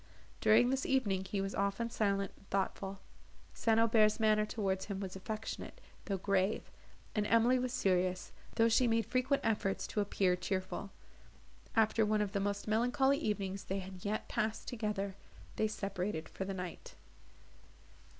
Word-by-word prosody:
During 240 Hz, +3 st, +5 dB
this 265 Hz, +1 st, 0 dB
evening 205 Hz, -8 st, +1 dB
he 195 Hz, +1 st, -2 dB
was 195 Hz, 0 st, -3 dB
often 200 Hz, +4 st, -1 dB
silent 200 Hz, -3 st, 0 dB
and 195 Hz, -, -23 dB
thoughtful; 195 Hz, 0 st, -2 dB, 0.5 s
St. 225 Hz, -1 st, +2 dB
Aubert's 220 Hz, -1 st, +4 dB
manner 215 Hz, -1 st, +3 dB
towards 195 Hz, -3 st, -1 dB
him 200 Hz, -2 st, -4 dB
was 190 Hz, -1 st, -5 dB
affectionate, 215 Hz, -, -5 dB, 0.3 s
though 195 Hz, -, -1 dB
grave, 195 Hz, +1 st, 0 dB, 0.4 s
and 210 Hz, -1 st, 0 dB
Emily 235 Hz, +3 st, +4 dB
was 250 Hz, 0 st, -1 dB
serious, 185 Hz, -5 st, +1 dB, 0.2 s
though 225 Hz, -, +5 dB
she 230 Hz, +2 st, +4 dB
made 225 Hz, -1 st, +2 dB
frequent 260 Hz, +4 st, +1 dB
efforts 210 Hz, -3 st, 0 dB
to 210 Hz, -, -1 dB
appear 195 Hz, -2 st, +2 dB
cheerful. 185 Hz, +2 st, -3 dB, 0.9 s
After 220 Hz, 0 st, +4 dB
one 215 Hz, 0 st, +2 dB
of 200 Hz, -, -4 dB
the 200 Hz, -, 0 dB
most 200 Hz, +1 st, -2 dB
melancholy 265 Hz, +5 st, +3 dB
evenings 200 Hz, -7 st, -2 dB
they 195 Hz, -, -2 dB
had 190 Hz, -1 st, -7 dB
yet 210 Hz, +1 st, -2 dB
passed 220 Hz, +1 st, -2 dB
together, 210 Hz, -4 st, -2 dB, 0.4 s
they 215 Hz, -, +2 dB
separated 195 Hz, -5 st, -3 dB
for 190 Hz, -, -5 dB
the 195 Hz, 0 st, -4 dB
night. 180 Hz, -2 st, -7 dB
210 Hz, 155 wpm, -34 LUFS, 195-225 Hz, 0.9 s, During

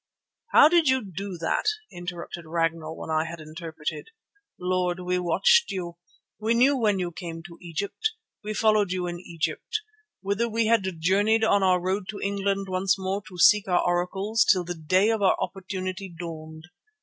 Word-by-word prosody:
"How -, -, +8 dB
did 335 Hz, -1 st, +3 dB
you 260 Hz, -3 st, +2 dB
do 195 Hz, 0 st, -6 dB
that?" 165 Hz, -1 st, -1 dB, 0.3 s
interrupted 175 Hz, -1 st, -7 dB
Ragnall 165 Hz, -1 st, -1 dB
when -, -, -6 dB
I 155 Hz, 0 st, +1 dB
had 165 Hz, +1 st, -7 dB
interpreted. 160 Hz, -, -6 dB, 0.5 s
"Lord, 180 Hz, 0 st, 0 dB
we 180 Hz, 0 st, -1 dB
watched 470 Hz, -, +3 dB
you. 175 Hz, -3 st, -5 dB, 0.4 s
We 220 Hz, +2 st, +1 dB
knew 265 Hz, +4 st, +5 dB
when 215 Hz, -6 st, +2 dB
you 180 Hz, -2 st, -2 dB
came 165 Hz, -1 st, -7 dB
to 170 Hz, -1 st, -12 dB
Egypt; 200 Hz, -, -3 dB, 0.3 s
we 215 Hz, +1 st, -4 dB
followed 215 Hz, -4 st, +3 dB
you 185 Hz, -1 st, -1 dB
in 175 Hz, 0 st, -4 dB
Egypt, 170 Hz, -, -3 dB, 0.4 s
whither 200 Hz, +4 st, 0 dB
we 230 Hz, 0 st, +1 dB
had 220 Hz, -3 st, +3 dB
journeyed 205 Hz, +7 st, +2 dB
on 205 Hz, -2 st, +4 dB
our 185 Hz, -1 st, +4 dB
road 185 Hz, +2 st, -1 dB
to 210 Hz, -, -5 dB
England 200 Hz, 0 st, -1 dB
once 185 Hz, +1 st, +1 dB
more 190 Hz, +1 st, -2 dB
to 180 Hz, -, -11 dB
seek 210 Hz, +4 st, +6 dB
our 180 Hz, -1 st, +2 dB
Oracles, 190 Hz, +5 st, +1 dB
till 185 Hz, -4 st, +3 dB
the 175 Hz, +1 st, -4 dB
day 185 Hz, +6 st, +2 dB
of 220 Hz, -2 st, -1 dB
our 195 Hz, -, +4 dB
opportunity 190 Hz, 0 st, -4 dB
dawned. 160 Hz, -2 st, -8 dB
185 Hz, 175 wpm, -26 LUFS, 175-205 Hz, 0.5 s, How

